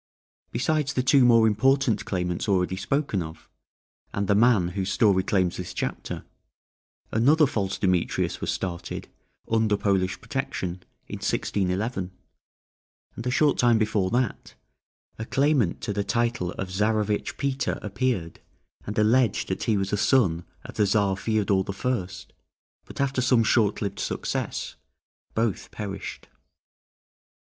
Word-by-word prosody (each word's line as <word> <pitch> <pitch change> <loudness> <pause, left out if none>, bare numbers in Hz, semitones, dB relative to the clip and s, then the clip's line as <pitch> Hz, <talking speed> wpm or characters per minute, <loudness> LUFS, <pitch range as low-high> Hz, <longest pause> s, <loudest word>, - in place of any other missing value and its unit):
Besides 145 +4 0
the 125 - +1
two 135 0 +5
more 115 -2 +6
important 115 +1 +2
claimants 90 -2 -2
already 95 -1 +1
spoken 100 +2 -1
of, 80 -1 -9 0.6
and 100 0 -2
the 100 - +4
man 105 -4 +4
whose 95 +1 -3
story 100 -4 +4
claims 95 -2 0
this 90 0 -6
chapter, - - -4 0.9
another 145 +8 +4
false 100 -7 -2
Demetrius 90 -3 0
was - - -2
started, 90 -2 -5 0.4
under 110 -2 +2
Polish 95 -3 0
protection, 95 -10 -4 0.3
in - - -6
1611; 95 +1 -1 1.1
and 115 - -5
a - - +2
short 145 +3 +2
time 120 -2 +5
before 105 -3 +1
that, 125 +3 -2 0.6
a 110 - -3
claimant 135 - +1
to 115 -3 -2
the 100 0 -1
title 115 -3 0
of 95 - -5
Czarevitch 105 +1 0
Peter 135 -1 -1
appeared, 105 -5 -2 0.5
and 105 - -4
alleged 110 +1 +3
that 95 - -2
he 110 -3 +2
was 95 0 -2
a - - +2
son 95 -9 +2 0.2
of - - -10
the 105 - +3
Czar 100 -1 +2
Feodor 100 -1 +1
the 100 - -5
First; 95 -5 -3 0.5
but - - -11
after 135 -1 +1
some 125 -2 +4
short 110 -2 +2
lived 100 - -4
success - - -3 0.6
both 110 -3 -1
perished. 100 -2 -6
105 Hz, 140 wpm, -25 LUFS, 95-120 Hz, 1.1 s, more